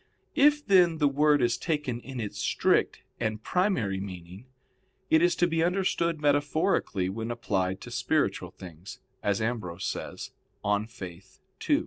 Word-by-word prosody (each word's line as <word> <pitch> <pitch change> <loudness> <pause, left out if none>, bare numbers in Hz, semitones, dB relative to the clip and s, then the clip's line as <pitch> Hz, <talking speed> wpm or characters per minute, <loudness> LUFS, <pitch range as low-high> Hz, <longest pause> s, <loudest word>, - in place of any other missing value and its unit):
If, 295 0 +4
then, 180 -5 +5
the 150 -2 +3
word 145 0 +3
is 120 0 +1
taken 145 -7 -2
in 130 0 -8
its 105 -3 -5
strict - - +1 0.2
and 110 0 -2
primary 135 - 0
meaning, 95 +3 -8 0.6
it 160 - +6
is 175 0 +3
to 175 - +3
be 165 -1 0
understood 170 -2 0
metaphorically 145 - +1
when 110 +4 -4
applied 95 -5 -1
to 120 - -9
spiritual 125 - 0
things, 90 0 -11 0.2
as 100 +1 0
Ambrose 100 -6 -3
says - - -5 0.3
(De 105 +1 +1
Fide 95 -6 -9 0.5
ii). - - +5
120 Hz, 145 wpm, -28 LUFS, 100-160 Hz, 0.6 s, it